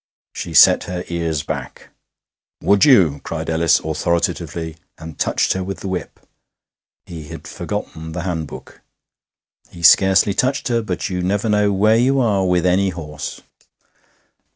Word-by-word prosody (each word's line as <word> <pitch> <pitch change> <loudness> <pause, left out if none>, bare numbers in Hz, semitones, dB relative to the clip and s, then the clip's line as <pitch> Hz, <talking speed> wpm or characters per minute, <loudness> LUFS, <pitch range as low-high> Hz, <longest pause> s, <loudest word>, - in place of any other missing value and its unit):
She - - -6
set - - +6
her 90 0 -5
ears 85 -3 -2
back. - - -7 0.7
'Would 100 0 +4
you!' 90 - +4
cried 80 0 -4
Ellis 80 0 +3
authoritatively, 80 +1 -2 0.2
and 80 -1 -11
touched - - +1
her 95 - -3
with 95 +1 -6
the - - -5
whip 95 -2 -5 0.9
(he 80 -4 -9
had - - -10
forgotten 80 0 -6
the 85 0 -4
handbook). 80 -5 -6 0.9
He 85 - -12
scarcely 95 +3 +5
touched 130 +4 -1
her, 115 -1 +1
but 95 -3 -4
you 90 -1 -2
never 100 +4 -1
know 105 -1 +2
where 105 +3 +3
you 135 +3 +2
are 100 -6 +1
with 90 -1 +1
any 95 +2 +2
horse. 75 -4 -7
90 Hz, 145 wpm, -19 LUFS, 80-100 Hz, 0.9 s, set